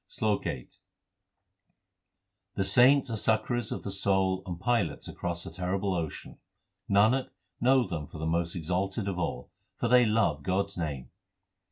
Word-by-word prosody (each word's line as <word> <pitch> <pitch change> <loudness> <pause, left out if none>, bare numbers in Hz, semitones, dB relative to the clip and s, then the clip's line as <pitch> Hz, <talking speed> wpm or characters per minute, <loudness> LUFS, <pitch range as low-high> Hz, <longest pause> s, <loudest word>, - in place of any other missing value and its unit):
SLOK 105 -2 -1
VIII - - -4 1.9
The 95 - +1
saints 130 +5 +5
are - - -2
succourers 110 +2 0
of - - -4
the 100 - -4
soul 95 -1 +1
and 85 -2 -5
pilots 100 -9 0
across 85 -1 -4
the - - -8
terrible 95 +2 -2
ocean: 85 -4 -5 0.5
Nanak, 110 +7 +3 0.3
know 130 +1 +4
them 80 -5 -4
for - - -11
the 80 - -4
most 85 +1 -1
exalted 95 +5 -2
of 95 -2 -2
all, 70 -7 -3 0.3
for - - -1
they 125 0 +5
love 100 -9 +1
God 95 +6 +1
s 100 - -8
name. 70 -6 -4
95 Hz, 155 wpm, -29 LUFS, 85-110 Hz, 1.9 s, saints